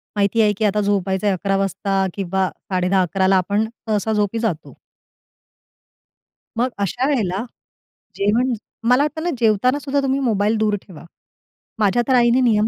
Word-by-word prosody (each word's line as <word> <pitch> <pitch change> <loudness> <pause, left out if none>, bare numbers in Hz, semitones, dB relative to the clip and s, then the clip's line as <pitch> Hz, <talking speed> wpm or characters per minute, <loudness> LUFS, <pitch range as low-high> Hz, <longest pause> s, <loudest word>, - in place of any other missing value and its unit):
माहिती 205 +2 +2
आहे, 210 -1 +3
की 215 - 0
आता 210 +1 +1
झोपायच 195 -1 0
आहे 200 -2 +2
11:00 195 +1 -1
वाजता 195 0 0
किंवा 190 -1 -1
10:30-11:00 185 -1 0
ला 195 - +4
आपण 205 +4 0 0.2
सहसा 215 +1 0
झोपी 210 +1 0
जातो. 210 -9 -3 1.8
मग 245 +2 +1
अशा 240 +7 -1
वेळेला 210 -6 0 0.7
जेवण 235 +6 +1 0.4
मला 255 +3 +5
वाटतं 310 +2 -3
ना 350 - 0
जेवतानासुद्धा 255 +6 +1
तुम्ही 270 0 0
मोबाईल 220 -3 +1
दूर 215 -1 +1
ठेवा. 175 -3 -13 0.7
माझ्यातर 240 +5 +2
आईने 240 0 +4
नियम 220 -3 +3
210 Hz, 140 wpm, -20 LUFS, 195-240 Hz, 1.8 s, मला